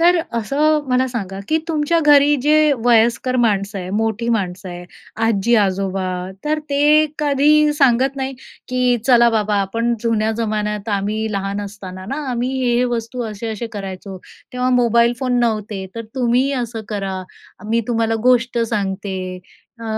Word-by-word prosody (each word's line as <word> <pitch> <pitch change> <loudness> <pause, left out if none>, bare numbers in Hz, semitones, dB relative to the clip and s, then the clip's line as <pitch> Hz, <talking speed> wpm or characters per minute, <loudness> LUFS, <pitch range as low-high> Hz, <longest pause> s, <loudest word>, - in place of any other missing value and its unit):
तर 350 +1 +5 0.2
असं 290 +6 +1
मला 255 +1 +2
सांगा, 195 -6 -5
की 315 +1 +2
तुमच्या 315 +1 +1
घरी 290 0 +6
जे 305 0 +4
वयस्कर 240 +2 +3
माणसं 205 -3 0
आहे, 180 0 -6
मोठी 225 +1 -1
माणसं 185 -1 -5
आहे, 175 0 -8 0.4
आजी-आजोबा, 195 -3 +1 0.4
तर 305 +1 0
ते 300 +2 +4
कधी 300 +1 +3
सांगत 270 -1 +2
नाही, 265 0 -3 0.3
की 250 -1 +2
"चला 235 -2 +6
बाबा 210 -2 0
आपण 230 +5 -1
जुन्या 220 -1 +1
जमान्यात 210 -1 -2
आम्ही 215 +2 -2
लहान 200 +1 -2
असताना 190 -2 -8
ना 275 - -2
आम्ही 245 +1 -1
हे 240 -1 +2
हे 250 - +2
वस्तू 230 +2 -4
असे-असे 220 +1 -5
करायचो. 195 -1 -7 0.4
तेव्हा 250 0 0
मोबाईल 235 0 +3
फोन 250 -2 0
नव्हते, 215 -4 -1
तर 230 0 -5
तुम्ही 250 +1 +1
असं 225 -1 -6
करा, 195 -3 -3 0.5
मी 230 +1 +2
तुम्हाला 225 -1 +1
गोष्ट 245 -1 +2
सांगते" 195 -2 -2 0.6
अ, - - -7
230 Hz, 145 wpm, -19 LUFS, 205-255 Hz, 0.6 s, घरी